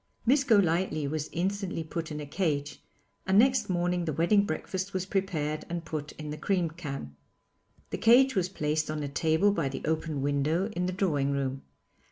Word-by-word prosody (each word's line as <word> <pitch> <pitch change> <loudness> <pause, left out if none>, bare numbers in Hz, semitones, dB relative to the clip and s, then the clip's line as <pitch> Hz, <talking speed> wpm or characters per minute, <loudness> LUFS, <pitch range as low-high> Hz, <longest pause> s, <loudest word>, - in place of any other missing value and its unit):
Miss 270 +4 +4
Golightly 180 - +2
was 155 +1 -3
instantly 190 -1 -2
put 160 0 -5
in 150 - -4
a 150 - -5
cage, 145 -2 -2 0.5
and 190 +1 +4
next 260 +1 +4
morning 175 -1 0
the 155 - -1
wedding 185 +7 +3
breakfast 190 +4 -3
was 185 0 -1
prepared 165 -6 -1
and 170 -1 -4
put 155 -2 -4
in 150 -1 -7
the 150 - -6
cream 180 -2 0
can. 140 - -6 0.8
The - - -3
cage 260 +4 +6
was 185 -3 0
placed 155 -3 -1
on 155 -1 -2
a - - -2
table 160 +7 +2
by 165 -9 0
the 135 - -6
open 155 -2 -1
window 150 +7 +1
in 180 -4 -2
the - - -1
drawing 155 -8 +1
room. 135 -1 -2
165 Hz, 185 wpm, -29 LUFS, 150-190 Hz, 0.8 s, cage